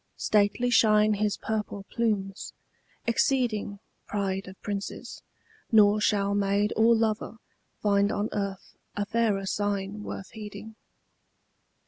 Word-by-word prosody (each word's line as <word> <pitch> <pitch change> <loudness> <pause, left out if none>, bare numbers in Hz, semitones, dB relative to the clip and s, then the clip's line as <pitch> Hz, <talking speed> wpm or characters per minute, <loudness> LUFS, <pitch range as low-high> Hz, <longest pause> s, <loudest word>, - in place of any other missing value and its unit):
Stately 215 +4 +2
shine 215 -2 +5
his 210 0 0
purple 210 -2 -3
plumes, 205 -4 -2 0.5
exceeding 235 -4 +1 0.3
Pride 195 -2 -2
of 190 0 -11
princes: 205 -1 -5 0.5
nor 210 -1 +5
shall 200 -1 +2
maid 200 +1 +1
or 230 +1 +5
lover 220 0 -1 0.5
Find 200 0 +3
on 210 -1 -1
earth 200 -2 -4 0.2
a 205 - -1
fairer 215 -3 0
sign 205 +1 -2
worth 195 -2 -7
heeding. 215 0 -9
205 Hz, 110 wpm, -27 LUFS, 200-220 Hz, 0.5 s, shine